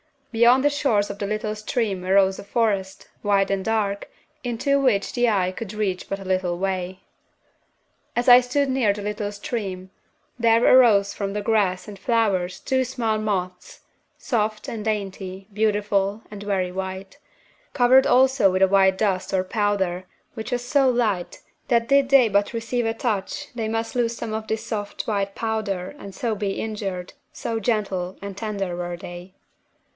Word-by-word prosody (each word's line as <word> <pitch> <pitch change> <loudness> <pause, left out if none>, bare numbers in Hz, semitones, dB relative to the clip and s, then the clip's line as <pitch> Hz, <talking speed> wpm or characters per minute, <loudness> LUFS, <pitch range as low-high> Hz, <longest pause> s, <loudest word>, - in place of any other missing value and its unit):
Beyond 240 +3 +5
the 290 - +5
shores 230 -8 +1
of 200 - -10
the 200 - -2
little 215 +1 -2
stream 210 -3 -2
arose 190 0 +3
a - - -7
forest, 200 -3 -1
wide 200 -1 +2
and 195 -1 0
dark, 205 -2 -1 0.3
into 250 +3 +1
which 240 -8 +1
the 245 0 +2
eye 185 -4 +1
could 205 +2 -7
reach 200 -4 -2
but 195 - -3
a - - -8
little 185 -2 0
way. 185 0 -3 1.1
"As 240 +1 0
I 245 0 +10
stood 265 +3 0
near 255 -6 +2
the 205 - -7
little 210 0 -3
stream, 195 -3 -5 0.5
there 230 0 +4
arose 215 -6 +5
from 200 -1 -3
the 210 - -2
grass 205 -4 +1
and 200 -2 -9
flowers 200 -5 0
two 260 0 +1
small 230 -4 -1
moths, 185 -4 -3 0.4
soft 215 -4 -1
and 220 -2 -5
dainty, 195 -3 -4
beautiful, 205 -1 0
and 205 -1 -8
very 195 -3 -1
white, 190 +5 -6 0.5
covered 255 +1 +5
also 260 -4 +4
with 185 0 0
a 190 - +5
white 190 -1 +4
dust 195 -3 -1
or 185 -1 +2
powder 190 -3 -1 0.3
which 220 +1 -6
was 245 0 -1
so 270 +1 +3
light 215 -8 -1 0.3
that 230 -1 +2
did 275 -1 +4
they 270 -4 +6
but 200 +2 +1
receive 230 +1 -2
a 225 - 0
touch 215 -6 -3
they 230 -2 -3
must 225 +2 -3
lose 235 -1 0
some 220 - -5
of 220 0 -4
this 220 0 -3
soft 205 -2 -4
white 200 -2 -2
powder 215 -5 -2
and 195 -1 -10
so 230 +1 -1
be 205 -1 -2
injured, 195 -5 -4 0.2
so 225 -1 -3
gentle 195 -5 -1
and 200 -1 -6
tender 200 -5 -3
were 175 0 -4
they. 175 +1 -10
205 Hz, 170 wpm, -23 LUFS, 190-230 Hz, 1.1 s, I